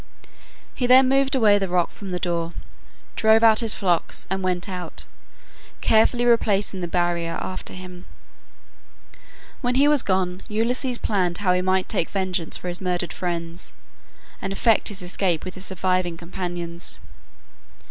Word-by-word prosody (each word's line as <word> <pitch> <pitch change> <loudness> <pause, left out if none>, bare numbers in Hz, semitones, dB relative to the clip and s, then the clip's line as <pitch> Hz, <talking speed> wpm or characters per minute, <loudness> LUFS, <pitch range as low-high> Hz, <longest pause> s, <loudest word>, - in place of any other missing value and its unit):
He 250 - -1
then 255 +1 +7
moved 270 0 +3
away 210 -5 +5
the 195 -2 -2
rock 175 -1 +1
from 200 - -9
the 180 - -2
door, 170 -2 -2 0.6
drove 220 +1 +4
out 220 -1 +6
his 225 -2 +2
flocks, 180 -4 0
and 190 0 -1
went 180 -1 -1
out, 180 -3 -3 0.7
carefully 235 +2 +3
replacing 205 -5 +2
the 175 - -2
barrier 170 -1 0
after 185 - -5
him. 180 -1 -10 1.5
When 245 -1 0
he 280 +2 +5
was 295 -3 +4
gone 185 -1 -1
Ulysses 240 +4 -1
planned 180 -6 0
how 185 -3 +2
he 180 - +1
might 185 0 +1
take 165 - -1
vengeance 185 -4 -1
for - - -8
his 175 +1 -4
murdered 180 -2 -2
friends, 170 -1 -5 0.7
and 195 - -3
effect 220 +3 +2
his 200 -4 -4
escape 175 -2 -1
with 185 - -6
his 190 0 -2
surviving 185 -2 -1
companions. 175 0 -5
185 Hz, 150 wpm, -23 LUFS, 175-220 Hz, 1.5 s, then